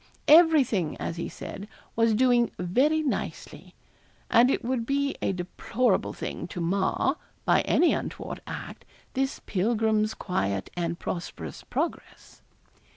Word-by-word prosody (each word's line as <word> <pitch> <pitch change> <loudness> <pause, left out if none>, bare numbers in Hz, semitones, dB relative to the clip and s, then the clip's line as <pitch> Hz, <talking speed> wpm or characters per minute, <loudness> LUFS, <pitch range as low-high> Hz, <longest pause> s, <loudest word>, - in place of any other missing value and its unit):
'Everything,' 290 - +5
as 170 - -4
he 170 - -3
said, 200 +2 -8 0.3
'was 230 -1 +3
doing 240 -1 +4
very 265 - +2
nicely;' 280 - -4 0.6
and 240 +2 +6
it 270 - 0
would 250 -1 0
be 280 +3 0
a - - +1
deplorable 190 +5 0
thing - - -5
to 180 - -7
mar, 190 - +1 0.3
by - - +4
any 350 - +4
untoward - - -5
act, - - -7 0.3
this 270 0 -1
pilgrim's 215 +1 +1
quiet 100 - -2
and 170 -1 -2
prosperous 85 - -6
progress. - - -5
220 Hz, 125 wpm, -27 LUFS, 180-260 Hz, 0.6 s, and